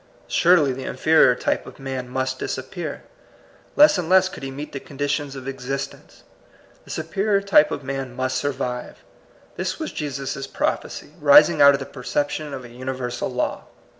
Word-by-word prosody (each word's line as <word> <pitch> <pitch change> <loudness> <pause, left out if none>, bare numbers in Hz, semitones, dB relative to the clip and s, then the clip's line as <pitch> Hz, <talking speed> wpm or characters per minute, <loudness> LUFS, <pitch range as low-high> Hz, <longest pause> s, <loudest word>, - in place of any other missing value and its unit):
Surely 165 -6 +4
the 130 +1 -7
inferior 155 -5 +4
type - - -2
of - - -11
man 130 -2 -5
must 130 0 -2
disappear. 150 +4 -5 0.7
Less 295 -9 +6
and 170 -2 -3
less 190 0 +5
could - - -10
he 135 - -5
meet 145 +3 -7
the 135 - -5
conditions 145 0 -3
of 135 -1 -8
existence. 135 +1 -6 0.6
The - - -17
superior 195 +6 0
type 195 -6 +4
of 145 - -5
man 135 -2 -5
must 130 0 -1
survive. 125 -3 -4 0.5
This - - -2
was 315 - -4
Jesus* 140 -2 -4
prophecy, - - -3
rising - - +6
out 140 0 +8
of - - -4
the 135 - -5
perception 145 +4 -3
of 130 -2 -7
a - - -11
universal 125 0 -4
law. 125 -1 -2
135 Hz, 165 wpm, -23 LUFS, 130-155 Hz, 0.7 s, out